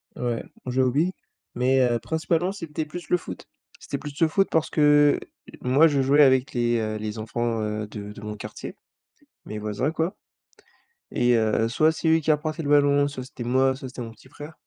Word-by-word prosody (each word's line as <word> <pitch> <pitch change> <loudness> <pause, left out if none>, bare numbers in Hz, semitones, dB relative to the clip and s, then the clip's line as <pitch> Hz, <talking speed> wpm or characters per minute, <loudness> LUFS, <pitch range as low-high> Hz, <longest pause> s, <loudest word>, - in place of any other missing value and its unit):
Ouais, 120 -2 -2 0.2
on 125 - -3
jouait 130 +1 +2
aux 125 - +2
billes, 165 +7 +1 0.4
mais, 130 +2 +3
heu, 120 -1 0
principalement, 165 +5 -1
c'était 160 -5 -5
plus 170 +1 -9
le 180 - +4
foot, 90 - -9 0.3
c'était - - -5
plus 145 0 -8
le 165 - +5
foot 195 +5 +2
parce 160 0 +1
que 145 -1 +4 0.4
moi, 135 +6 +5
je 140 -3 +1
jouais 145 +3 +5
avec 130 -1 +3
les, 120 -1 +1
heu, 110 -1 -2
les 110 +1 -5
enfants, 115 0 -2
heu, 105 0 -3
de 105 -1 -8
de 105 - -11
mon 105 0 -6
quartier, - - -8 0.7
mes 105 - -5
voisins, 105 +7 -2
quoi 165 +4 -2 1.0
et 120 0 +3
heu, 110 0 +2
soit 155 +7 +3
c'est 160 - -3
eux 160 0 +5
qui 155 0 +1
apportaient 155 +2 -2
le 145 - -3
ballon, 145 -1 +4
soit 130 -3 -6
c'était 125 -2 -8
moi, 130 +2 +2
soit 135 0 -8
c'était 125 -1 -8
mon 115 -1 -6
petit 115 +4 -19
frère, 150 +3 -10
130 Hz, 210 wpm, -25 LUFS, 115-155 Hz, 1.0 s, le